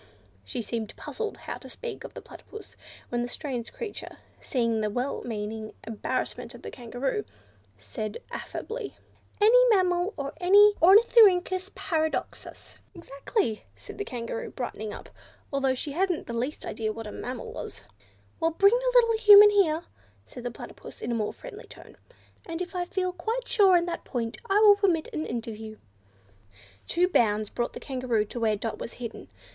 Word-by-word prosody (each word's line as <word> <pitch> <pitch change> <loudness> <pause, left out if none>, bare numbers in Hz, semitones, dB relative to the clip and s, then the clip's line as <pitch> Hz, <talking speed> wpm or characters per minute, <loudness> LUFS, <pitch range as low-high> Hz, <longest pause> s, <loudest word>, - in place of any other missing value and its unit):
She 160 - -4
seemed 220 0 -4
puzzled 445 -2 -5
how - - -7
to - - -12
speak 480 -1 -7
of - - -10
the - - -8
Platypus, 430 -1 -12 0.3
when 240 0 -1
the 240 - -2
strange 245 -3 -5
creature, 455 -4 -7 0.2
seeing 230 -4 0
the 215 - 0
well 250 +6 -2
meaning 215 -1 -5
embarrassment 220 -1 -3
of - - -13
the - - -6
Kangaroo, 245 +2 -3 0.5
said 105 - -5
affably, 445 -2 -6 0.4
"any 460 +4 +7
mammal 365 -2 +2
or 280 0 -4
Ornithorhynchus 390 0 +6
Paradoxus." 315 -2 -3 0.2
"Exactly," 280 - -2
said - - -11
the - - 0
Kangaroo, 230 - -5
brightening 220 -4 -5
up, - - -9 0.5
although 270 -1 +1
she 285 +3 -4
hadn't 360 +2 0
the 235 - -6
least 250 +6 -3
idea 220 -1 -2
what 225 +1 -7
a 210 - -6
mammal 445 - -6
was. - - -8 0.6
"Well, 325 0 +2
bring 395 +6 +4
the - - +2
little 460 -2 +5
Human 415 -1 +10
here," 340 -5 +3 0.4
said 245 - -10
the 245 - -2
Platypus 235 - -11
in 235 - -2
a - - 0
more 215 -2 -1
friendly - - -11
tone, - - -13 0.5
"and 330 -1 -4
if 365 +1 -5
I 360 -1 -1
feel 365 0 -2
quite 450 +8 -3
sure 385 -4 +5
on 345 - +1
that 340 -1 -4
point 230 -3 -3
I 395 +1 +4
will 410 -2 +8
permit 365 -6 +1
an 310 - -3
interview." 220 -2 -6 1.1
Two 355 +1 +2
bounds 215 - +2
brought 240 - -2
the - - -7
Kangaroo 250 -5 -1
to 240 - -7
where 220 -2 +2
Dot 220 +2 -4
was - - -6
hidden. 235 - -8
310 Hz, 165 wpm, -27 LUFS, -, 1.1 s, Human